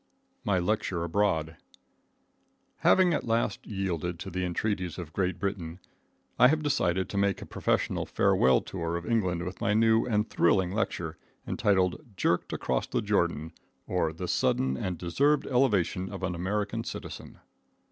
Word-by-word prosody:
My 100 -6 +1
Lecture 90 -2 0
Abroad. 80 -3 0 1.2
Having 185 -2 +4
at - - 0
last 115 -3 -1
yielded 90 -4 -2
to - - -6
the 90 +1 -2
entreaties 90 -1 -2
of 85 -3 -7
Great 95 -2 0
Britain, 90 -3 -4 0.6
I 125 - +9
have 155 +3 +1
decided 95 - +1
to 100 - -1
make 100 -1 +1
a - - -8
professional - - -1
farewell 65 - +3
tour 85 -2 -3
of 85 - -7
England 90 -7 0
with 90 0 -7
my 105 - +2
new 115 +1 +4
and 105 -2 +1
thrilling 90 +1 +2
lecture, 85 -6 -2 0.3
entitled 95 - +1
"Jerked 85 - +1
Across - - -1
the - - -1
Jordan, 80 +2 0 0.3
or 85 -3 0
the 85 +3 -6
Sudden 65 -5 +1
and 90 +6 -3
Deserved 140 - +2
Elevation 105 -8 +1
of 95 -1 -7
an 90 -1 -1
American 105 +5 -2
Citizen." - - -8
95 Hz, 150 wpm, -28 LUFS, 85-105 Hz, 1.2 s, I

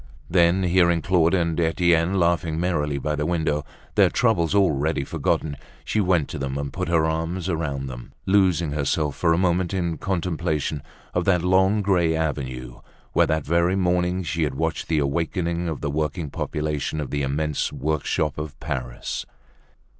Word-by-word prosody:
Then, 90 +1 +4
hearing 85 -2 +3
Claude 90 -1 +3
and 85 -2 0
Etienne 85 +2 +2
laughing 85 -2 +1
merrily 75 -5 0
by 75 +2 -1
the 75 0 -1
window, 80 -4 0 0.3
their - - +5
troubles 105 -7 +2
already 80 -6 +2
forgotten, 75 +2 -1 0.3
she 110 - +1
went 90 -6 +2
to 80 - -5
them 70 0 -3
and 70 -1 -4
put - - -3
her 85 -2 +3
arms 80 +3 -2
about 75 -6 -2
them, - - -8
losing 90 -5 +3
herself 75 0 0
for 85 - +2
a 80 - +3
moment 90 0 +1
in 85 -4 -1
contemplation 80 -5 -1 0.3
of 90 -1 0
that 90 -3 +3
long 95 +3 +3
gray 90 -5 +2
avenue 65 -6 -3 0.3
where, - - +4
that 80 -1 0
very 85 +4 +2
morning, 90 0 +1
she 80 +1 -2
had 70 -4 0
watched 80 +3 -2
the 80 - +1
awakening 85 +4 -1
of 80 - -5
the 75 - -2
working 75 0 -2
population, 75 0 -2
of 75 - -4
the 70 - -1
immense 75 +2 -1
work 75 +1 -2
shop 75 -1 -1
of 75 -2 -6
Paris. - - -4
80 Hz, 170 wpm, -24 LUFS, 75-90 Hz, 0.3 s, their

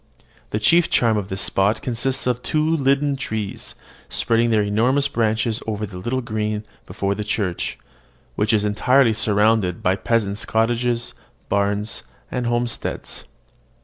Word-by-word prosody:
The - - -1
chief 165 +11 +4
charm 115 -2 +3
of 105 -3 -2
this 95 - -2
spot 100 +3 +1
consists 130 +2 -1
in 125 -1 +2
two 155 +5 0
linden 140 0 +2
trees, 110 -6 -4 0.3
spreading 115 +1 +2
their 110 -2 +3
enormous 125 +7 +2
branches 110 -2 0
over 105 -1 -2
the 95 -3 -8
little 125 +7 -1
green 110 -2 -2 0.2
before 100 0 -1
the 105 - -4
church, 100 -4 -2 0.6
which 105 0 +1
is 105 -2 +2
entirely 120 +4 +3
surrounded 105 -3 +2
by 90 +1 +3
peasants' 105 -1 0
cottages, 120 +1 0 0.4
barns, 100 +2 0 0.3
and 125 -1 -1
homesteads. 120 -1 -2
110 Hz, 140 wpm, -22 LUFS, 105-125 Hz, 0.6 s, chief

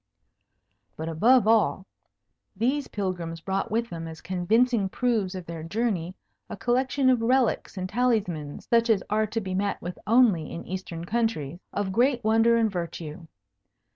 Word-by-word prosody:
But 160 +1 -4
above 225 +8 +4
all, 220 -4 +3 0.7
these 260 +7 0
pilgrims 180 -5 -4
brought 190 +4 -2
with 230 +2 -1
them 165 -1 -5
as 160 -1 -9
convincing 205 +4 +1
proofs 215 -5 0
of 185 -2 -6
their 165 -1 -6
journey 185 -1 -2 0.3
a 215 - -6
collection 260 +3 +1
of 245 -3 +2
relics 245 -3 +1
and 185 0 -2
talismans 195 -10 -1
(such 235 0 +3
as 210 -4 +3
are 215 +1 +2
to 225 +2 -2
be 190 -3 -5
met 200 +2 -1
with 175 +1 -7
only 215 -9 +4
in 170 - -7
Eastern 175 -3 -6
countries) 175 -8 -1
of 200 -1 -2
great 245 +3 +2
wonder 225 +2 +4
and 225 -2 +2
virtue. 170 -3 -6
205 Hz, 155 wpm, -26 LUFS, 175-235 Hz, 0.7 s, above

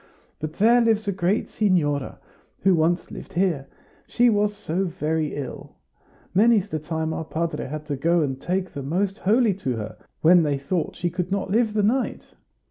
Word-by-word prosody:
But 155 0 -4
there 235 +4 +4
lives 220 -2 +2
a - - +2
great 190 +2 0
signora, 150 -9 0 0.4
who 190 -1 +4
once 170 +1 +1
lived - - -9
here; 170 -7 0 0.4
she 240 0 +3
was 210 0 +1
so 185 +3 -2
very 160 -2 -2
ill! 140 -3 -7 0.6
Many's 210 0 +4
the 155 - -2
time 160 +1 -3
our 160 - -3
padre 165 +1 -3
had 150 +2 -6
to 145 -2 -2
go 170 +5 +2
and 135 -2 -3
take 185 +1 -2
the 140 - -5
Most 190 +8 -1
Holy 220 +2 +3
to 135 -10 -3
her, 110 -1 -6 0.2
when 175 +2 +6
they 145 -3 0
thought 155 +5 -2
she 175 -1 -2
could 180 +1 -3
not 195 -1 -1
live 225 0 +2
the 210 - +2
night. 250 +6 -1
175 Hz, 185 wpm, -24 LUFS, 155-205 Hz, 0.6 s, when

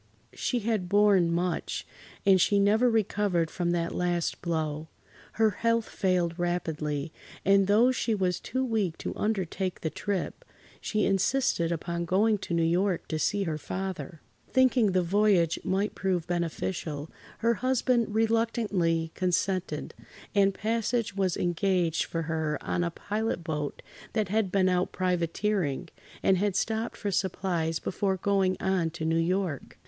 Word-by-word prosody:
She 245 -2 -1
had 210 -5 -1
borne 200 -4 +4
much, 175 0 -1 0.4
and 190 -2 +6
she 205 - +3
never 215 +5 +4
recovered 205 -6 +1
from 175 -2 -1
that 170 -1 0
last 175 -1 -1
blow. 160 -2 -2 0.5
Her 220 -1 +3
health 230 +2 0
failed 180 -3 0
rapidly, 160 -4 -2 0.3
and 195 0 +5
though 225 +5 +5
she 235 -3 0
was 185 -3 0
too 260 +2 -2
weak 210 -9 -1
to - - -5
undertake 190 -3 -2
the 160 - -2
trip, 200 -3 -3 0.4
she 215 -1 0
insisted 195 -3 +1
upon 170 +1 -2
going 210 +5 +2
to 170 - -3
New 165 - +2
York 180 +2 +1
to 155 - -1
see 205 +5 +1
her 155 -4 -2
father. 180 -4 -5 0.3
Thinking 255 -6 +3
the 185 -1 +3
voyage 185 -2 +3
might 195 +3 0
prove 185 -4 -1
beneficial, 165 -3 -3 0.3
her 230 +1 +2
husband 245 -2 +1
reluctantly 220 -8 +1
consented, 185 -3 -1 0.4
and 200 -1 +4
passage 225 +1 -1
was 190 -3 0
engaged 175 -1 +1
for 165 -1 -3
her 160 -2 -1
on 175 - -1
a 170 - 0
pilot 210 +2 -3
boat 150 -3 -4 0.3
that 215 -4 0
had 210 -2 +1
been 190 -2 +3
out 180 0 +1
privateering, 180 -3 -1 0.3
and 190 -2 +4
had 200 -1 0
stopped 225 +1 -1
for 205 - -2
supplies 175 -4 -1
before 190 +2 -1
going 190 0 +1
on 190 -4 +1
to 160 0 -5
New 165 +1 +2
York. 175 -4 -1
185 Hz, 145 wpm, -28 LUFS, 170-210 Hz, 0.5 s, and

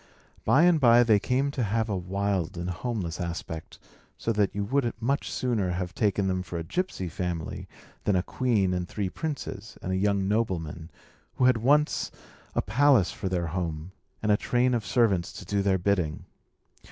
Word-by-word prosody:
By 155 - +5
and 175 -2 +5
by 120 -2 +7
they 110 -3 +4
came 130 +6 0
to 135 - -3
have 110 +1 0
a 105 - -1
wild 95 -1 -1
and 85 +1 -3
homeless 90 -3 -3
aspect; 85 -2 -5 0.4
so 115 - -1
that 105 -2 +1
you 100 - -1
would 130 +1 +1
much 135 +5 -1
sooner 115 -7 0
have 90 -1 -3
taken 100 +1 +1
them 95 -1 0
for 90 -2 -6
a 85 - -3
gypsy 95 - -2
family 85 -1 -4 0.4
than 100 - +3
a 90 - +2
queen 105 -6 +1
and 90 -1 -2
three 100 -3 -2
princes, 105 - -5
and 95 - -4
a - - +1
young 100 0 +1
nobleman, 85 -7 -1 0.5
who 125 - +2
had 125 -2 +5
once 145 +6 +2 0.5
a - - +1
palace 125 -2 +4
for 95 - -4
their 90 -2 -1
home, 85 0 -3 0.3
and 105 - +2
a 105 - +5
train 125 +3 +1
of 115 -4 -1
servants 105 -9 +2
to 95 - -9
do 100 +2 0
their 95 -1 +2
bidding. 90 -4 0
100 Hz, 185 wpm, -27 LUFS, 90-120 Hz, 0.5 s, by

